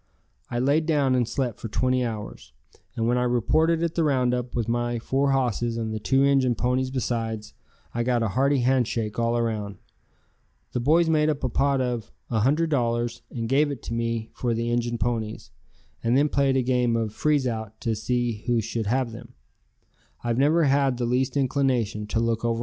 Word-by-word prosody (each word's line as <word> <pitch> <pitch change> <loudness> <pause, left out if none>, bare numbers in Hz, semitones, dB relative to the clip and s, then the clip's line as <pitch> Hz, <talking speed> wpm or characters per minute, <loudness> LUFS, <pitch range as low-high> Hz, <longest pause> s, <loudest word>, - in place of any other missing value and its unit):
I 120 - -3
laid 145 +5 +2
down 145 -5 +2
and 125 -3 +2
slept 125 -5 -2
for - - -5
twenty 130 +4 +1
hours, 110 -3 -6 0.4
and 115 0 0
when 120 +1 +2
I - - +1
reported 155 +8 +2
at 165 -1 -1
the 165 - +1
roundup 125 -4 0
with 115 -2 -1
my 120 0 0
four 135 +4 0
hosses 120 -3 0
and 110 -1 -3
the 110 - -3
two 135 +5 +2
Injun 135 -3 +3
ponies 125 +2 0
besides, 115 -4 -3 0.4
I 120 - -1
got 120 -1 +1
a 110 - 0
hearty 135 +5 +2
handshake 120 -4 0
all 115 0 +1
around. 110 -4 -2 0.9
The - - -2
boys 160 +7 +3
made 155 -1 +3
up 150 -2 -2
a 130 - +1
pot 135 +2 +1
of 120 -3 -3 0.2
a 115 - +1
hundred 150 +8 +2
dollars 120 -3 0
and 115 -2 -4
gave 145 +4 +3
it 140 -5 -6
to - - -5
me 115 -1 -2
for 120 -2 -1
the 115 +1 -1
Injun 120 0 0
ponies, 110 -2 -3 0.5
and 120 +2 +3
then 145 +2 +3
played 140 -2 +2
a 130 - +2
game 125 -2 +1
of 110 -2 -1
freeze 150 -1 +1
out 110 -3 -4
to 115 -1 0
see 120 -1 -1
who 120 -1 +2
should 110 0 -3
have 125 +1 0
them. 115 -3 -11
120 Hz, 170 wpm, -25 LUFS, 115-135 Hz, 0.9 s, Injun